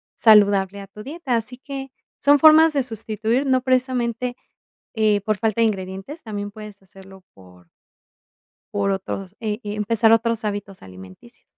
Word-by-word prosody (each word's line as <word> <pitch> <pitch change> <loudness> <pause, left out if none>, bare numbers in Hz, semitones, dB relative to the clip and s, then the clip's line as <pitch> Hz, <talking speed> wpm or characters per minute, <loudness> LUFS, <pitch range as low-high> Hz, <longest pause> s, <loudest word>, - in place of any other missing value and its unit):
saludable 200 -3 +4
a 195 - -11
tu 210 +2 -12
dieta, 285 -2 -3
así 230 +2 -6
que 270 0 -8 0.3
son 285 0 +4
formas 315 +2 +7
de 280 -2 +1
sustituir, 225 +2 -1
no 260 -1 +2
precisamente, 250 -1 -1 0.6
eh, 215 -2 +2
por 215 0 -1
falta 220 0 -1
de 230 - +4
ingredientes, 195 - -5
también 205 -2 -6
puedes 210 -2 -11
hacerlo 190 0 -16
por 90 -2 -19 1.0
por 200 -1 0
otros, 195 0 -5
eh 215 -1 -3
eh, 205 0 -4
empezar 220 +2 +2
otros 225 -1 +1
hábitos 200 -2 -5
alimenticios. 95 0 -14
215 Hz, 150 wpm, -21 LUFS, 195-250 Hz, 1.0 s, formas